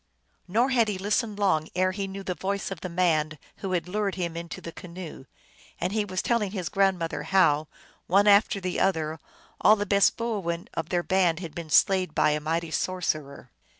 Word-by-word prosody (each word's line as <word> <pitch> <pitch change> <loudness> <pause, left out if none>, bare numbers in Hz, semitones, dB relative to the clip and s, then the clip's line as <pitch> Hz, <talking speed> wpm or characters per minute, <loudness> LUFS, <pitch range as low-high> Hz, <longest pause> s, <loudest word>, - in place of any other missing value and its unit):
Nor 235 +8 +2
had 235 -4 +3
he 205 -2 -2
listened 205 +2 -1
long 185 -7 +1
ere 185 +1 +2
he 195 +1 -3
knew 195 0 -7
the 185 - -2
voice 200 +2 -3
of 185 -3 -6
the 185 - -4
man 160 -3 +1 0.2
who 190 -2 -4
had 175 -1 -1
lured 200 0 -1
him 170 -3 -3
into 170 0 -6
the 170 - -8
canoe, 170 -5 -9 0.5
and 180 +3 -1
he 215 -1 +1
was 185 -1 -3
telling 230 -4 +1
his 185 -5 -4
grandmother 190 -4 +1
how, 155 -6 +3 0.4
one 200 +3 +4
after 205 0 +5
the 185 -1 -3
other, 160 -4 0 0.4
all 215 - +7
the 205 -1 -2
best 200 -1 +3
boo 230 -3 -2
oin 170 -1 -3
of 165 0 -4
their 175 -1 0
band 185 -3 +2
had 165 -4 -7
been 165 0 -7
slain 185 +3 +4
by 150 - +4
a 150 - 0
mighty 160 +2 -2
sorcerer. 155 -8 -2
185 Hz, 200 wpm, -26 LUFS, 165-200 Hz, 0.5 s, all